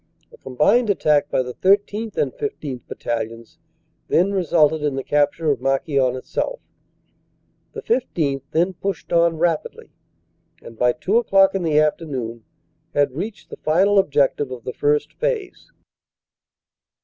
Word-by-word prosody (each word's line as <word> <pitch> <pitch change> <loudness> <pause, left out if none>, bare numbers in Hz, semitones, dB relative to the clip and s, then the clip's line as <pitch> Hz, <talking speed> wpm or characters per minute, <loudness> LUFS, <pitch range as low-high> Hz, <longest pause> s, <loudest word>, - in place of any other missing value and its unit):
A - - -16
combined 150 - +2
attack 150 -6 +2
by 130 - +1
the 125 0 -7
13th. 205 - +1
and - - 0
15th. 155 - -5
Bat - - -9
talions 115 +4 -5 0.5
then 185 +4 +2
resulted 160 -5 +2
in 145 -2 -1
the 135 - -3
capture 150 +2 +1
of 130 -4 -2
Marquion 135 -1 +1
itself. - - -3 1.1
The - - -7
15th. 160 - -1
then 175 +4 +1
pushed 195 +2 -5
on 170 -1 +3
rapidly, 165 -1 -2 0.7
and 115 - -11
by 125 +2 +2
two 185 +9 0
o 240 - +3
clock 195 -2 +4
in 195 - -1
the 155 -3 +2
after 155 +2 +1
noon 120 -5 -5 0.5
had 145 -1 +2
reached 200 - -7
the - - -8
final 190 +6 +3
objective 145 -5 +1
of 125 -2 -8
the 125 - -5
First 150 +1 0
Phase. 475 -6 -3
155 Hz, 150 wpm, -21 LUFS, 135-195 Hz, 1.1 s, clock